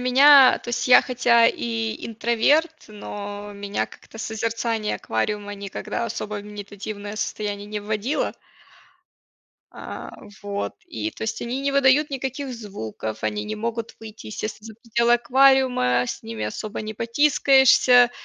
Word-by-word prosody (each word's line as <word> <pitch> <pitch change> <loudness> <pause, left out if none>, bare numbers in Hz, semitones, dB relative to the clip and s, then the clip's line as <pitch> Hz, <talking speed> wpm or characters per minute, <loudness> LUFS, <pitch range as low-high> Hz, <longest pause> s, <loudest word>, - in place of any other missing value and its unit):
меня, 265 +2 +7
то - - -12
есть 240 +1 -2
я, 250 - +9
хотя 235 -2 +3
и 225 -1 -2
интроверт, 255 +8 +1
но 205 0 -7
меня 200 0 -3
как-то 225 - -15
созерцание 225 0 -2
аквариума 205 - -3
никогда 200 +3 -5
особо 210 -2 -4
в - - -12
медитативное 205 0 -7
состояние 205 -1 -4
не 210 0 -4
вводило. 215 +6 -2 1.4
А, - - -8 0.3
вот. 200 0 -4
И, 325 -1 -4
то - - -10
есть 220 0 -3
они 245 +3 -3
не 280 0 -1
выдают 280 +2 +4
никаких 265 0 -4
звуков, 110 - -7
они 210 0 -2
не 215 0 -5
могут 230 +1 -4
выйти, 220 -1 -11
естественно, 215 0 -6
за 220 - -10
пределы 235 +1 +1
аквариума, 250 - +3
с - - -5
ними 110 -1 -5
особо 205 - -5
не 215 0 -6
потискаешься. 255 0 +5
225 Hz, 140 wpm, -23 LUFS, 205-250 Hz, 1.4 s, я